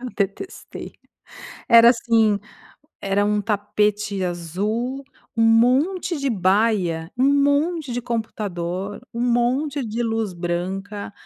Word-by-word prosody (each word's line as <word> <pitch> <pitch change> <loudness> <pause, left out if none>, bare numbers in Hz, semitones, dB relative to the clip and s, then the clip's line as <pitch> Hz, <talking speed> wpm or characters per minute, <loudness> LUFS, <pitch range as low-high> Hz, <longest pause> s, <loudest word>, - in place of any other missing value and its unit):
eu 255 - -5
detestei, 205 - -5 0.8
era 230 0 +9
assim 225 -3 +2 0.6
era 200 +1 +1
um 210 0 +1
tapete 210 -1 -1
azul, 210 - -3 0.3
um 225 - +2
monte 285 +10 +3
de 275 - -1
baia, 185 -4 +1
um 275 +2 +4
monte 290 0 +1
de 245 0 -3
computador, 200 -5 -4
um 235 - -3
monte 250 +4 +1
de 230 +3 -2
luz 225 -4 -1
branca. 190 +4 -4
220 Hz, 110 wpm, -22 LUFS, 195-245 Hz, 0.8 s, era